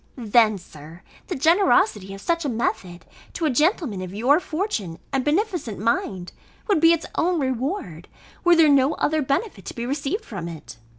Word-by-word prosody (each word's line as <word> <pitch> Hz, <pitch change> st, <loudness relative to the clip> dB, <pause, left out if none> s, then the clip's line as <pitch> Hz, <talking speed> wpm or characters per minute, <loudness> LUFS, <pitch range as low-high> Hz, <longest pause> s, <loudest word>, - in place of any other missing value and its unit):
Then, 220 Hz, -2 st, +3 dB
Sir, 160 Hz, -1 st, -13 dB, 0.2 s
the -, -, -3 dB
generosity 330 Hz, -, +3 dB
of 195 Hz, -, -11 dB
such 335 Hz, +5 st, 0 dB
a 290 Hz, -, -1 dB
method, 220 Hz, -6 st, -3 dB, 0.3 s
to 335 Hz, -, -2 dB
a 305 Hz, -, +2 dB
gentleman 295 Hz, -, +1 dB
of 185 Hz, +1 st, -7 dB
your 260 Hz, +9 st, +3 dB
fortune, 310 Hz, -, -3 dB, 0.2 s
and 270 Hz, -1 st, +1 dB
beneficent 315 Hz, -, -1 dB
mind, 195 Hz, -4 st, -2 dB, 0.4 s
would 400 Hz, -8 st, +2 dB
be 330 Hz, 0 st, +7 dB
its 335 Hz, -1 st, +1 dB
own 350 Hz, 0 st, +1 dB
reward, 260 Hz, -, -3 dB, 0.4 s
were 350 Hz, -1 st, +5 dB
there 325 Hz, -2 st, +6 dB
no 280 Hz, 0 st, +4 dB
other 310 Hz, 0 st, 0 dB
benefit 275 Hz, -, -2 dB
to -, -, -7 dB
be 235 Hz, -, -4 dB
received 285 Hz, -, -3 dB
from 190 Hz, -6 st, -6 dB
it. 160 Hz, -8 st, -10 dB
265 Hz, 175 wpm, -23 LUFS, 200-330 Hz, 0.4 s, be